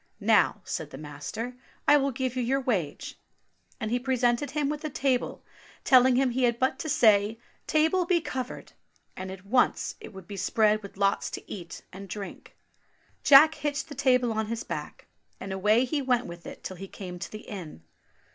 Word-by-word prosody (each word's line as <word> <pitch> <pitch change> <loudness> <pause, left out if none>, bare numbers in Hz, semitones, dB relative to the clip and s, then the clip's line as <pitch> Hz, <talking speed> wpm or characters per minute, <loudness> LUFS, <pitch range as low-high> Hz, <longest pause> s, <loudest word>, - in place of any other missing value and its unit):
"Now," - - +3
said - - -4
the - - -9
master, 155 - -6 0.3
"I 290 - +8
will 280 -1 +1
give 260 -1 -3
you 255 - 0
your 260 +3 +1
wage"; 200 - -2 0.6
and 220 -2 -3
he 245 - +1
presented 250 +1 +1
him 295 -1 -1
with 300 +1 -3
a 310 - -2
table, 265 -3 -1 0.4
telling 255 -1 +6
him 260 0 +2
he 255 +1 +2
had 235 -1 +1
but 260 +1 0
to 315 - -4
say, 215 -6 +4 0.3
"Table, 320 +3 +2
be 350 -1 +3
covered," 255 -6 -6 0.4
and 185 0 -6
at 190 0 -9
once 245 +5 +2
it - - -10
would 190 -3 -11
be 200 - -7
spread 215 +3 +2
with 200 -2 -11
lots 200 0 +1
to - - -8
eat 175 -4 -8
and 195 +1 -9
drink. 200 +1 -8 0.7
Jack 295 +3 +8
hitched 295 0 -3
the - - -6
table 250 -3 +2
on 220 0 -1
his 230 +1 -3
back, - - -6 0.3
and 190 0 -5
away 210 +6 +3
he 290 +3 -1
went 250 -2 +1
with 170 0 -9
it - - -10
till 185 - -6
he 195 +2 -7
came 180 -2 -8
to - - -6
the 215 - -7
inn. 170 - -9
240 Hz, 195 wpm, -27 LUFS, 200-270 Hz, 0.7 s, I